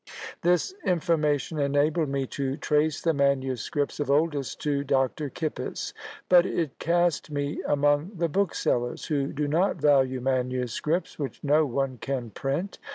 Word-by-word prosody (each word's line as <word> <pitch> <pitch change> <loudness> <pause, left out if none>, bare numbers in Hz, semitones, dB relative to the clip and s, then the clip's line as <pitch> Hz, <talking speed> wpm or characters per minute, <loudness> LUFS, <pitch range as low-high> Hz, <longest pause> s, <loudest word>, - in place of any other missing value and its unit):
This 180 - +2
information 160 -4 +1
enabled 145 +2 +1
me 135 -1 -1
to 135 0 -2
trace 150 -1 +1
the 165 - +3
manuscripts 140 0 0
of 145 - -1
Oldys 145 -2 +1
to 145 -2 -1
Dr. 135 +2 0
Kippis; 155 +2 -4 0.3
but 180 -1 +7
it 165 -6 -2
cast 175 -2 +1
me 145 0 -2
among 145 +5 +2
the 170 -1 0
booksellers, 155 -9 0
who 140 -3 0
do 145 +1 -2
not 170 +7 +2
value 135 -4 +3
manuscripts 130 +6 -1
which 140 -3 -5
no 150 +1 +3
one 135 -1 -2
can 130 -5 -3
print. 140 - -3
145 Hz, 140 wpm, -27 LUFS, 135-160 Hz, 0.3 s, but